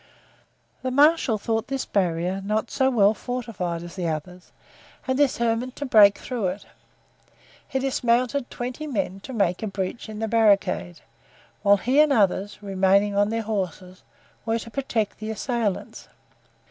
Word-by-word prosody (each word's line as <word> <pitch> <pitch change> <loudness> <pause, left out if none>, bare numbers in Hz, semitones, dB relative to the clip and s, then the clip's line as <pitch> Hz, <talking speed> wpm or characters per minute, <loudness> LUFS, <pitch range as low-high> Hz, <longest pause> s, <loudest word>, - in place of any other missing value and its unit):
The 260 - -2
marshal 285 -3 +4
thought 225 +1 -2
this 270 -1 -3
barrier 180 0 -1
not 215 +2 -1
so 265 0 +2
well 215 -5 +4
fortified 210 -9 -4
as 175 0 -10
the 180 -3 -2
others 175 +3 -6 0.6
and 260 - +1
determined 250 -3 0
to 290 - -4
break 210 -5 +6
through 235 -7 -3
it. 185 +3 -5 1.0
He 265 - -2
dismounted 255 0 0
twenty 255 +5 -5
men 200 -7 -2
to 230 - -10
make 200 -7 0
a 220 - -2
breach 195 +3 -4
in 215 - -7
the 225 +1 -2
barricade, 205 -5 +2 0.6
whilst 200 -1 +4
he 260 +5 +3
and 305 -1 +3
others, 205 -3 +1
remaining 195 +1 +2
on 205 +1 +3
their 225 0 -2
horses, 185 -3 -4 0.4
were 225 +1 0
to 230 0 -8
protect 230 -6 -2
the 215 0 -5
assailants. 220 -2 -3
215 Hz, 150 wpm, -24 LUFS, 195-245 Hz, 1.0 s, break